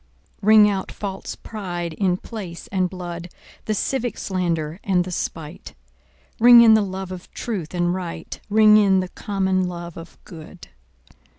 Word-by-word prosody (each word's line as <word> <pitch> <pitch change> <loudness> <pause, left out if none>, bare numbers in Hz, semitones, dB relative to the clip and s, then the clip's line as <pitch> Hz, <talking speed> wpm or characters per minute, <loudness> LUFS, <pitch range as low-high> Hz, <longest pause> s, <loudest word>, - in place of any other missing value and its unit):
Ring 215 +1 +7
out 195 -2 -2
false 195 -2 -6
pride 175 -6 -6
in 180 +1 0
place 185 -6 -8
and 185 -2 0
blood, 175 -1 -7 0.4
The 215 - -1
civic 245 +3 -2
slander 170 -3 -2
and 185 -3 +2
the 180 - -7
spite; 165 -1 -6 0.6
Ring 240 +1 +9
in 225 -1 +7
the 220 - +5
love 190 -1 -5
of 185 -1 -9
truth 185 -8 -4
and 175 0 +1
right, 175 -3 -6
Ring 215 0 +6
in 195 -3 +4
the 185 - -5
common 190 -2 -1
love 175 -1 -7
of 165 0 -11
good. 165 +1 -12
185 Hz, 155 wpm, -22 LUFS, 175-205 Hz, 0.6 s, Ring